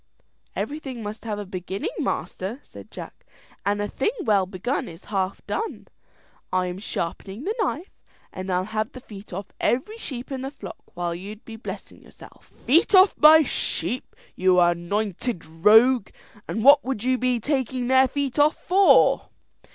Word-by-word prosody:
"Everything 270 -5 -5
must 210 +2 -7
have 215 -2 -3
a 205 - -5
beginning, 190 - -4
master," 200 +8 -3
said - - -13
Jack, - - -10 0.4
"and 205 +1 0
a 205 - -1
thing 265 - -1
well 200 -4 +2
begun 235 +8 -3
is 165 -1 -12
half 190 0 -2
done. 445 - -4 0.6
I 185 0 +1
am 180 +1 -5
sharpening 195 +3 -5
the 415 - -1
knife, 355 -2 -2 0.4
and 185 0 -5
I'll 180 0 +1
have 215 +2 -3
the 255 - -8
feet 210 -4 -12
off 185 +2 -6
every 420 - -1
sheep 260 - -7
in 265 -1 -4
the 265 - -4
flock 215 -10 -10 0.2
while 175 -1 -2
you'd 200 +5 -9
be 225 - -9
blessing 225 - -9
yourself." - - -16
"Feet 330 +9 +2
off 375 +1 +7
my 315 +1 +8
sheep, 255 -2 -3 0.2
you 185 0 +4
anointed 175 +3 0
rogue! 210 +9 +4 0.4
and 220 - -3
what 285 +2 +7
would 255 -5 -3
you 255 0 +1
be 250 -1 +1
taking 260 -1 -1
their 260 +1 +5
feet 280 -1 -2
off 295 +1 +4
for?" 385 +2 +4
225 Hz, 165 wpm, -24 LUFS, 190-265 Hz, 0.6 s, my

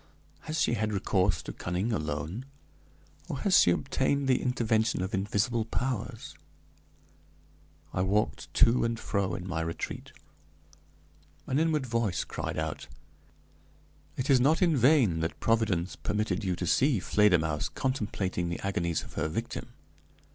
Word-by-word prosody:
Has 155 +1 -2
she - - +2
had 110 -1 0
recourse 95 -1 +1
to - - -6
cunning 90 +6 -2
alone, 75 - -3 0.8
or 135 - -4
has 200 -3 +5
she - - +5
obtained 140 +10 +1
the 130 - +3
intervention 110 -5 +1
of 95 +4 -4
invisible 105 +4 0
powers?" 125 +1 -3 1.6
I 90 - 0
walked 100 +3 0
to 120 +2 +5
and 115 -1 -1
fro 95 -3 -1
in 90 - -6
my 80 -3 -2
retreat. 80 0 -5 1.3
An 130 - 0
inward 155 -3 +1
voice 115 -6 0
cried - - -5
out: - - -3 1.3
"It 130 - -2
is 130 - +6
not 150 +6 +3
in 170 -3 +3
vain 125 - +4
that 80 +1 -3
Providence 105 -6 +1
permitted 105 -1 -2
you 90 -2 0
to 90 - -3
see 130 - +3
Fledermausse 90 -7 +2
contemplating 100 -9 -2
the 85 - -3
agonies 85 -5 -1
of - - -12
her - - -1
victim. 80 - -4
105 Hz, 140 wpm, -29 LUFS, 90-125 Hz, 1.6 s, is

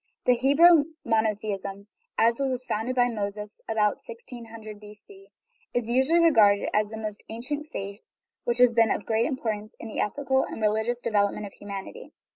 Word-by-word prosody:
The 250 - +6
Hebrew 285 +6 +6 0.2
monotheism, 205 -3 -1 0.3
as 230 +2 +3
it 275 -1 +1
was 255 -1 -3
founded 240 +2 -2
by 245 -1 +4
Moses 210 -2 -5
(about 210 -2 +2
1600 230 -2 -10
B.C.), 215 - -15 0.5
is 240 -2 0
usually 265 +7 +3
regarded 215 -12 +5
as 210 0 +2
the 220 -1 -5
ancient 270 +7 -5
faith 200 -2 -6 0.4
which 240 0 -1
has 250 -1 +5
been 230 -1 +4
of - - 0
the - - -20
greatest 225 +4 +1
importance 220 -5 -4
in 225 - -7
the - - -5
ethical 265 +4 +1
and - - -7
religious 220 +3 0
development 205 -1 0
of 200 - -9
humanity. 205 - -8
225 Hz, 165 wpm, -26 LUFS, 210-250 Hz, 0.5 s, The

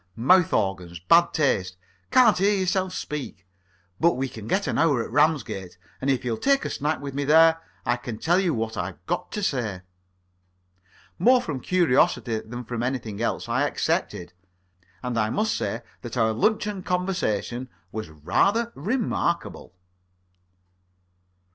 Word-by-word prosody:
Mouth 170 +9 +4
organs. 90 -3 -1
Bad 170 - +4
taste. 95 - 0 0.3
Can't 235 -6 +6
hear 200 +2 +3
yourself 185 0 0
speak. 145 - -6 0.5
But 170 +1 +4
we 135 +1 -1
get 115 - -2
an - - -1
hour 145 -7 +3
at - - -9
Ramsgate, 120 - 0 0.2
and 135 - -1
if 130 -2 0
you'll 115 -2 -1
take 275 0 +2
a - - -3
snack 150 +2 -1
with 140 -1 -6
me 140 +1 -2
there, 160 +3 +5 0.2
I 120 - +1
can 120 -2 -6
tell 175 +9 +2
you 185 -3 +1
what 110 -1 -3
I've 90 0 -5
got 175 +1 -3
to 210 - -3
say." 110 - -2 1.4
More 255 +2 +5
from 145 - -4
curiosity 135 -9 +2
than 120 +3 -8
from 120 0 -4
anything 115 -4 -3
else, 115 - -2
I - - +1
accepted. 85 0 -2 0.7
And 125 -2 -1
I 110 0 +1
must 215 - 0
say 115 +1 -3 0.2
that 120 0 -7
our 110 -1 +2
luncheon 210 - 0
conversation 175 - -2 0.2
was 110 -5 -5
rather 200 - +1
remarkable. 170 - -2
135 Hz, 150 wpm, -25 LUFS, 110-180 Hz, 1.4 s, Can't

